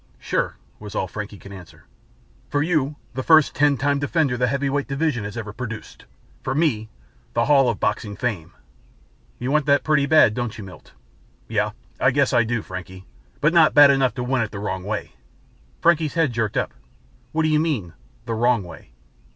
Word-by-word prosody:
"Sure," - - -2 0.2
was 105 0 -9
all 95 - -1
Frankie 105 +1 -7
could 100 - -13
answer. 95 -4 -13 0.6
"For 145 0 +1
you, 150 -3 0 0.2
the 130 - -3
first 155 +1 +5
Ten 145 -1 +3
Time 140 +3 +1
Defender 145 -2 +1
the 125 0 +1
heavyweight 140 +2 -1
division 135 -4 -1
has 105 +3 -7
ever 105 -2 -6
produced. 115 -2 -8 0.4
For 135 - -3
me, 125 -9 0 0.5
The 115 0 +2
Hall 135 -4 +4
of 115 - -2
Boxing 105 -4 -1
Fame." 110 -10 -3 0.9
"You 125 +2 -3
want 150 -1 +1
that 140 -1 +4
pretty 150 -2 +2
bad, 155 -8 +5
don't 120 -1 -4
you, 105 - -7
Milt?" 95 -1 -13 0.5
"Yeah, 105 -1 -1 0.3
I 130 - +4
guess 140 +1 +1
I 120 -2 +4
do, 115 -1 -2
Frankie, 95 0 -9 0.4
but 150 +3 +3
not 165 -3 +5
bad 145 -1 +9
enough 135 -4 +1
to 125 - -3
win 125 0 0
it 110 - -2
the 105 - -8
wrong 95 -2 -4
way." 105 +2 -4 0.7
Frankie's 165 -3 +2
head 160 -7 +1
jerked 110 -3 -1
up. - - -1 0.6
"What 160 0 0
do 155 - +2
you 155 -1 +3
mean, 130 - -2 0.3
the 115 - -3
wrong 120 -1 +2
way?" 85 -8 -13
125 Hz, 190 wpm, -22 LUFS, 105-145 Hz, 0.9 s, bad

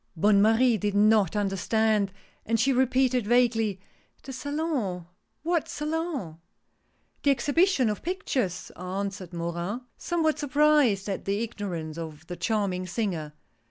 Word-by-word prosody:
Bonne 200 +4 +4
Marie 225 +2 +4
did 205 +1 -1
not 210 -3 +4
understand, 205 +1 +1 0.3
and 225 +1 0
she 270 +5 +3
repeated, 255 -2 +2
vaguely: 225 -4 +2 0.2
" - - -38
The 265 - -7
Salon! 260 - -2 0.4
What 335 -1 0
Salon? 300 - -3 0.4
" - - -43
"The 285 - +2
Exhibition 285 - +3
of 210 -1 -2
Pictures!" 265 - -2
answered 185 0 -5
Morin, 170 +6 -3 0.2
somewhat 315 -3 0
surprised 290 -8 +3
at 195 - -4
the 200 +2 0
ignorance 175 -8 -5
of 160 -1 -8
the 175 - -6
charming 195 -4 -1
singer. 175 -7 -3
215 Hz, 130 wpm, -27 LUFS, 190-265 Hz, 0.4 s, Bonne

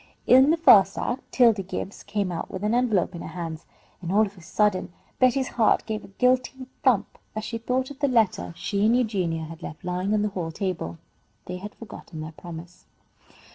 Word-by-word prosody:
In 260 +3 +7
the 330 - +4
first 195 - +6
act 250 +2 -3
'Tildy 230 -5 +4
Gibbs 190 +1 -6
came 200 -2 -2
out 170 - -4
with 190 - -6
an 210 +2 +1
envelope 225 -7 +2
in 170 - -7
her - - -6
hands, 165 -1 -6 0.3
and 175 -1 -4
all 215 +3 +4
of 200 0 -10
a 180 - -15
sudden 190 +2 0 0.3
Betty's 255 +1 +3
heart 225 -2 +2
gave 215 -1 -4
a - - -11
guilty 255 +4 0 0.2
thump 245 -7 +1 0.2
as 215 - -3
she 230 +1 -4
thought 255 +3 -1
of 280 - -11
the 285 - +2
letter 210 - +1
she 200 0 -1
and 235 +2 +4
Eugenia 185 -9 -1
had 165 +1 -9
left 160 +2 -8
lying 180 +3 0
on 210 - +1
the 210 - 0
hall 175 -4 -4
table. 160 - -3 0.5
They 180 - -5
had 205 +3 -9
forgotten 185 -7 -10
their 155 +1 -6
promise. 170 +2 -11
200 Hz, 205 wpm, -25 LUFS, 175-240 Hz, 0.5 s, In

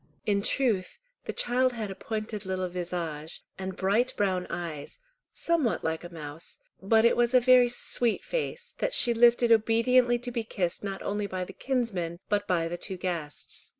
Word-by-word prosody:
In 200 -1 +2
truth 215 - 0 0.3
the - - -2
child 255 +1 +2
had 215 -4 -4
a - - -3
pointed 215 +1 -5
little 185 -1 -2
visage, 170 -3 -4 0.2
and 190 -1 -4
bright 205 +7 +1
brown 185 -3 0
eyes, 165 - -5 0.3
somewhat 325 -9 +1
like 160 +1 -2
a 175 - -9
mouse, 155 -1 -7 0.2
but 220 +3 +4
it 235 - +5
was 240 +1 +2
a - - +9
very 250 0 +6
sweet 240 -1 0
face 485 0 -4
that - - 0
she 240 - +5
lifted 235 0 +5
obediently 240 +2 +4
to 245 +1 -6
be 235 -1 -2
kissed 185 -5 -2
not 195 -1 -4
only 205 0 -2
by 185 -1 -3
the - - -9
kinsman, 195 -11 -2
but 205 -1 0
by 170 -2 +1
the 175 +1 -4
two 190 -2 -4
guests. 170 -5 -4
205 Hz, 180 wpm, -28 LUFS, 180-240 Hz, 0.3 s, a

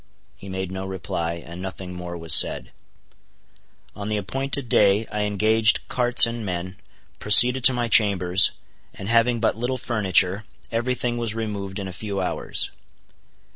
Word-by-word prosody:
He 100 - -13
made 95 -1 -6
no 95 0 -7
reply, 90 -3 -5
and 85 +2 -11
nothing 95 -1 -8
more 90 -1 -8
was 80 -1 +2
said. - - +3 1.2
On 105 0 -7
the 105 - -2
appointed 135 +6 -5
day 105 0 +1
I 105 -1 -3
engaged 110 +2 +1
carts 120 -1 +6
and 115 -1 -6
men, 95 0 -6 0.4
proceeded 125 +4 +6
to 130 - +8
my 120 -1 -3
chambers, 95 -4 +4 0.5
and 95 - -9
having 115 +1 +1
but 110 - -1
little 125 +3 -4
furniture, 100 -4 -1 0.3
every 120 +2 -2
thing 120 -1 -4
was 115 -2 -3
removed 100 -4 -6
in 100 -2 -6
a 95 - -9
few 100 +1 -6
hours. 90 - -2
105 Hz, 155 wpm, -21 LUFS, 95-115 Hz, 1.2 s, to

